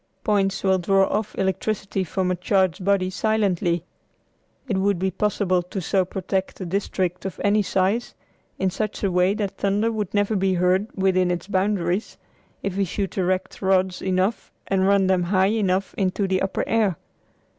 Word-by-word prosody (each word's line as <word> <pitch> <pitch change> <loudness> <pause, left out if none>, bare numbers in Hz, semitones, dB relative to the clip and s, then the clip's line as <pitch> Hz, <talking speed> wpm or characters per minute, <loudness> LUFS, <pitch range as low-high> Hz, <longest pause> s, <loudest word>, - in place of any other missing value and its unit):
Points 195 -3 +1
will 190 -1 +3
draw 195 +2 +3
off 215 0 -2
electricity 195 +1 -1
from 185 +1 -1
a - - +1
charged 185 0 +1
body 190 -1 +2
silently. 185 -5 0 0.8
It 195 -6 0
would 200 0 +2
be 190 +2 -1
possible 190 -2 +1
to 180 +3 -6
so 185 +1 +1
protect 190 +1 -3
a 185 - -4
district 185 -1 -2
of 190 -5 -5
any 205 +1 +3
size 195 +4 0 0.4
in 190 -1 0
such 215 +3 -3
a 195 - +1
way 180 +2 +3
that 205 -3 -3
thunder 205 +3 +1
would 210 -4 -3
never 205 +1 +1
be 190 -1 +1
heard 180 +3 +2
within 185 -2 +2
its 175 0 -2
boundaries 190 -1 0 0.5
if 195 -1 -3
we 200 - +2
should 195 +2 -3
erect 185 0 -1
rods 190 -1 +1
enough 190 +3 -1
and 190 -1 +1
run 200 -1 +4
them 185 -1 +2
high 190 +2 +2
enough 195 -3 0
into 195 +1 0
the 185 0 0
upper 190 - -1
air. 215 -7 +1
190 Hz, 170 wpm, -23 LUFS, 185-200 Hz, 0.8 s, run